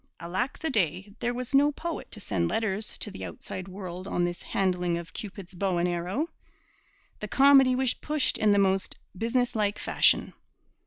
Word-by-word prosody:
Alack 185 Hz, +10 st, -2 dB
the 320 Hz, -, -2 dB
day, 190 Hz, -, 0 dB
there 240 Hz, -, 0 dB
was 250 Hz, +1 st, -5 dB
no 285 Hz, +2 st, +5 dB
poet 330 Hz, +3 st, -5 dB
to 215 Hz, -, -7 dB
send 85 Hz, -, -1 dB
letters 210 Hz, -, -1 dB
to 210 Hz, -, -5 dB
the 195 Hz, -, -8 dB
outside 185 Hz, 0 st, -7 dB
world 185 Hz, -1 st, -7 dB
on 175 Hz, -3 st, +1 dB
this 175 Hz, 0 st, -4 dB
handling 180 Hz, -3 st, 0 dB
of 170 Hz, -1 st, -8 dB
Cupid's 195 Hz, -4 st, -8 dB
bow 185 Hz, 0 st, 0 dB
and 170 Hz, +1 st, +2 dB
arrow! 180 Hz, -, -1 dB, 0.9 s
The -, -, -5 dB
comedy 270 Hz, -2 st, +6 dB
was 260 Hz, -2 st, +1 dB
pushed 300 Hz, -2 st, 0 dB
in 215 Hz, -, +4 dB
the 205 Hz, -, +4 dB
most 195 Hz, -1 st, +1 dB, 0.2 s
business 235 Hz, +5 st, 0 dB
like 205 Hz, -1 st, +1 dB
fashion. -, -, +3 dB
200 Hz, 175 wpm, -28 LUFS, 180-250 Hz, 0.9 s, comedy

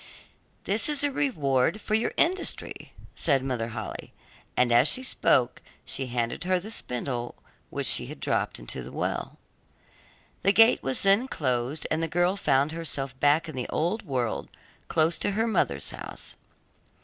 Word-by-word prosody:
'That 210 Hz, +8 st, +5 dB
is 290 Hz, -1 st, +2 dB
a 290 Hz, -, +1 dB
reward 150 Hz, -, +1 dB
for 215 Hz, -, -5 dB
your 220 Hz, +1 st, +2 dB
industry,' 365 Hz, +3 st, -1 dB, 0.2 s
said 140 Hz, -5 st, +1 dB
Mother 125 Hz, -4 st, -2 dB
Holle, 110 Hz, -2 st, -5 dB, 0.6 s
and 125 Hz, -1 st, +3 dB
as 120 Hz, +4 st, +7 dB
she 255 Hz, +12 st, +1 dB
spoke 125 Hz, -, +2 dB, 0.2 s
she 135 Hz, -, -1 dB
handed 120 Hz, +4 st, -2 dB
her 185 Hz, 0 st, +1 dB
the 210 Hz, +5 st, -9 dB
spindle 125 Hz, -, -4 dB, 0.3 s
which -, -, -3 dB
she -, -, +2 dB
had -, -, -9 dB
dropped -, -, -1 dB
into -, -, -2 dB
the -, -, -9 dB
well. -, -, -3 dB, 1.0 s
The 200 Hz, -, +3 dB
gate 225 Hz, +1 st, +6 dB
was 135 Hz, -1 st, -1 dB
then 200 Hz, +6 st, +4 dB
closed, 130 Hz, -, -2 dB
and 155 Hz, -, +1 dB
the 165 Hz, -, 0 dB
girl 175 Hz, +3 st, +1 dB
found 145 Hz, -5 st, +1 dB
herself 140 Hz, -5 st, -4 dB
back 150 Hz, +4 st, +3 dB
in 155 Hz, -, -7 dB
the 125 Hz, -, -4 dB
old 175 Hz, +8 st, -1 dB
world 125 Hz, -6 st, -3 dB, 0.4 s
close 160 Hz, +1 st, +2 dB
to -, -, 0 dB
her 225 Hz, -, +2 dB
mother's 225 Hz, -, 0 dB
house. -, -, -9 dB
150 Hz, 160 wpm, -27 LUFS, 125-195 Hz, 1.0 s, as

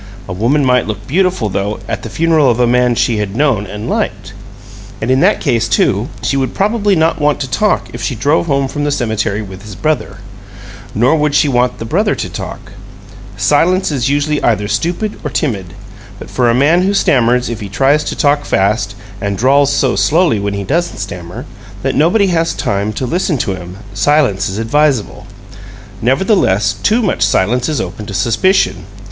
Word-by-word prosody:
A 90 Hz, -, -5 dB
woman 125 Hz, +9 st, +1 dB
might 125 Hz, -3 st, +2 dB
look 105 Hz, -1 st, -5 dB
beautiful, 180 Hz, -, 0 dB
though, 100 Hz, +1 st, -2 dB
at -, -, -3 dB
the 115 Hz, -, -7 dB
funeral 160 Hz, 0 st, +2 dB
of 120 Hz, 0 st, 0 dB
a 125 Hz, -, +4 dB
man 125 Hz, +1 st, +3 dB
whom 120 Hz, -, 0 dB
she 120 Hz, -1 st, +1 dB
had 105 Hz, -1 st, -3 dB
known 125 Hz, -7 st, +1 dB
and 105 Hz, +3 st, -6 dB
liked. -, -, -3 dB, 0.7 s
And 115 Hz, +3 st, -1 dB
in 130 Hz, -, +3 dB
that -, -, +3 dB
case, 115 Hz, -1 st, 0 dB
too, 105 Hz, +8 st, +1 dB
she -, -, 0 dB
would 130 Hz, -2 st, -1 dB
probably 205 Hz, 0 st, +1 dB
not 160 Hz, -1 st, +1 dB
want 145 Hz, 0 st, +2 dB
to 135 Hz, -, -2 dB
talk 205 Hz, +12 st, 0 dB
if 120 Hz, -, -7 dB
she 115 Hz, +3 st, -2 dB
drove 145 Hz, +9 st, +1 dB
home 140 Hz, -2 st, +1 dB
from 145 Hz, +2 st, -4 dB
the 145 Hz, -, 0 dB
cemetery 110 Hz, -6 st, -1 dB
with 95 Hz, -1 st, -10 dB
his 105 Hz, -1 st, -10 dB
brother: 155 Hz, +7 st, -2 dB, 0.8 s
nor 125 Hz, +8 st, +3 dB
would 150 Hz, -2 st, 0 dB
she -, -, +4 dB
want 125 Hz, -2 st, +1 dB
the 115 Hz, -, -6 dB
brother -, -, +1 dB
to -, -, -4 dB
talk. -, -, -7 dB, 0.7 s
Silence 175 Hz, +5 st, +2 dB
is 135 Hz, -3 st, 0 dB
usually 145 Hz, +1 st, 0 dB
either 105 Hz, -3 st, +1 dB
stupid 180 Hz, -, -2 dB
or -, -, -2 dB
timid. 100 Hz, -, -3 dB, 0.4 s
But -, -, -11 dB
for 125 Hz, -2 st, +2 dB
a 115 Hz, -, +2 dB
man 150 Hz, +7 st, +3 dB
who 195 Hz, +2 st, +1 dB
stammers 125 Hz, -7 st, +2 dB
if 115 Hz, -2 st, -4 dB
he 105 Hz, -3 st, -7 dB
tries 135 Hz, +8 st, +2 dB
to -, -, -3 dB
talk 145 Hz, 0 st, +2 dB
fast, 100 Hz, -1 st, 0 dB, 0.3 s
and 100 Hz, -1 st, -2 dB
drawls 140 Hz, +4 st, +3 dB
so 135 Hz, -5 st, +1 dB
slowly, 145 Hz, -, +2 dB
when 100 Hz, 0 st, -2 dB
he 100 Hz, -, -3 dB
doesn't 170 Hz, -, -1 dB
stammer, 90 Hz, -4 st, -7 dB, 0.4 s
that -, -, 0 dB
nobody 175 Hz, +9 st, +3 dB
has 165 Hz, 0 st, 0 dB
time 100 Hz, +1 st, -1 dB
to 130 Hz, -, -3 dB
listen 170 Hz, +2 st, 0 dB
to 100 Hz, -, -1 dB
him, 90 Hz, 0 st, -9 dB, 0.2 s
silence 105 Hz, -3 st, +2 dB
is 95 Hz, -, -5 dB
advisable. 130 Hz, +1 st, 0 dB, 0.7 s
Nevertheless, 120 Hz, -, +2 dB
too 230 Hz, +3 st, +2 dB
much 200 Hz, -, -1 dB
silence 120 Hz, +8 st, +1 dB
is 150 Hz, -, -1 dB
open 95 Hz, +3 st, -5 dB
to 100 Hz, -, -6 dB
suspicion. 155 Hz, -, +1 dB
125 Hz, 195 wpm, -14 LUFS, 105-150 Hz, 0.8 s, a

